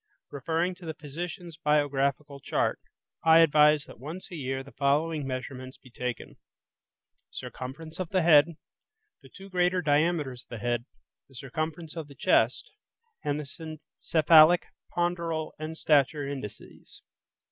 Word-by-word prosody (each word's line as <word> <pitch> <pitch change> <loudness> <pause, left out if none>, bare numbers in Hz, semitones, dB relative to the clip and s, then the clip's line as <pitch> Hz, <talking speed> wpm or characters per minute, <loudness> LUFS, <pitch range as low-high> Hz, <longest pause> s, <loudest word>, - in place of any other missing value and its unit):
Referring 160 +6 -1
to 180 -1 -13
the 160 - -4
physician's 170 +3 -7
biographical 145 -1 +1
chart, 140 - -1 0.4
I 160 0 +7
advise 150 -2 +5
that - - -14
once 160 +10 -8
a - - -6
year 135 -3 -3
the 140 - -14
following 150 +1 0
measurements 130 0 -6
be 130 - -18
taken: 125 -1 -5 0.9
Circumference 155 +6 -8
of 185 -3 -3
the 185 -3 +1
head; 160 0 +6 0.7
the - - -16
two 195 0 -12
greater 180 -1 +1
diameters 150 -4 +1
of - - -29
the 120 - -6
head; 120 +1 -1 0.4
the 135 - -19
circumference 155 +6 -5
of 160 -3 -5
the 140 - -14
chest; 120 - +2 0.5
and 145 0 -1
the 155 +2 -8 0.2
cephalic, 160 +2 +6 0.3
ponderal, 170 -2 -1
and 155 +1 -5
stature 145 -1 +2
indices. 135 -7 -9
150 Hz, 135 wpm, -28 LUFS, 135-165 Hz, 0.9 s, I